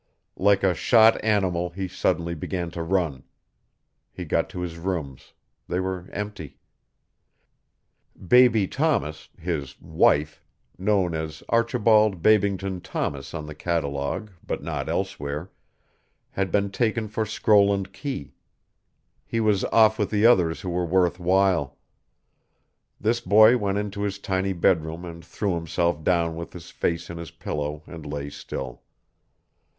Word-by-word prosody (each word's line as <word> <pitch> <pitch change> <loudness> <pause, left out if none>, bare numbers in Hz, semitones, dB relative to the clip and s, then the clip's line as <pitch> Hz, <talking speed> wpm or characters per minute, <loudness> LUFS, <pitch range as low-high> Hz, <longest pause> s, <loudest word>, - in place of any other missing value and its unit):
Like 100 0 +3
a 95 -2 +4
shot 115 +5 +4
animal 95 -5 +1
he 95 +2 -4
suddenly 85 -1 -1
began 85 +1 -4
to 85 - -5
run. 85 -6 -1 0.9
He - - -7
got - - 0
to 90 - -6
his 85 -2 -5
rooms; 80 -7 -5 0.3
they 90 - -1
were 95 -1 -4
empty; 105 -8 -6 1.7
Baby 120 -3 +5
Thomas, 135 - -1
his 80 -6 -4
"wife," 75 +1 +1 0.3
known 95 -2 +1
as 80 -1 -5
Archibald 110 -4 +3
Babington 100 -3 +2
Thomas 70 -2 -4
on 75 -2 -5
the 75 - -8
catalogue, 75 +4 -2
but - - -4
not - - -3
elsewhere, 75 +5 -3 0.8
had 95 -2 -2
been 100 +1 +1
taken 110 +1 0
for 110 +1 -2
Scroll 105 -1 +3
and 100 -1 -2
Key; 130 - -5 0.9
he 115 - -3
was 105 -3 +2
off 110 -1 +4
with 105 -2 0
the 105 0 +2
others 90 -9 +4
who 90 - -4
were 90 +1 0
worth 90 0 +1
while. 90 -4 +2 1.2
This 115 +3 +1
boy 110 +1 +6
went 100 -4 -1
into 100 -1 -3
his 100 -1 -2
tiny 95 -1 -1
bedroom 85 -1 0
and 85 -1 -9
threw 100 +4 -2
himself 85 -1 -1
down 85 -2 +1
with 85 +1 -7
his 90 0 -10
face 85 -1 -2
in 85 - -7
his 85 -2 -7
pillow 75 +1 -5
and 80 -3 -10
lay 70 -1 -5
still. 65 -3 -7
90 Hz, 140 wpm, -25 LUFS, 80-105 Hz, 1.7 s, boy